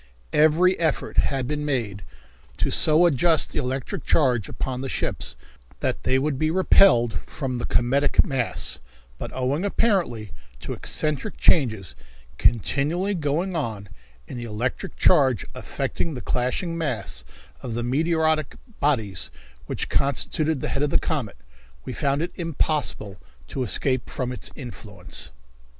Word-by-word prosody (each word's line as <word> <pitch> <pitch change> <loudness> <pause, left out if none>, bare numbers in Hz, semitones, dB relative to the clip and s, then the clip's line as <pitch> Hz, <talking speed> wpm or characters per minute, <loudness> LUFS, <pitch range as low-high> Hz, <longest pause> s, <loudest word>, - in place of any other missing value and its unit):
Every 160 +5 +4
effort 160 -4 0
had 135 -2 +2
been 150 +3 -2
made 115 -9 -1 0.6
to - - 0
so 160 +3 +5
adjust 165 0 +3
the - - -2
electric 130 -1 -3
charge 125 -9 +2
upon 130 -1 -3
the 135 - -4
ships - - -2 0.4
that - - -1
they 130 - +2
would 140 0 -1
be 155 - +2
repelled 130 - +5
from 130 -3 -5
the - - -3
cometic 135 +4 +3
mass, 130 -4 -1 0.4
but, - - -4
owing 130 +6 -1
apparently 185 - 0 0.3
to - - -4
eccentric 150 -3 +1
changes 110 - +2 0.4
continually 150 - +1
going 170 +3 -1
on 110 - -3 0.4
in - - -7
the 120 - -5
electric 120 - -3
charge 135 - +4
affecting 165 -4 -3
the 125 - -5
clashing 130 +8 -1
mass 115 - -2 0.4
of 115 -3 -5
meteoric 155 +2 +1 0.2
bodies 110 - +1 0.4
which - - -3
constituted 140 +2 +1
the - - -2
head 135 - -1
of 145 - +2
the - - +3
comet, 130 - -2 0.5
we - - -5
found 140 +2 0
it 175 - -3
impossible 150 - -1 0.3
to 135 - -3
escape 130 +1 0
from 125 -2 -3
its 125 - -4
influence. 105 - -6
135 Hz, 135 wpm, -24 LUFS, 120-155 Hz, 0.6 s, so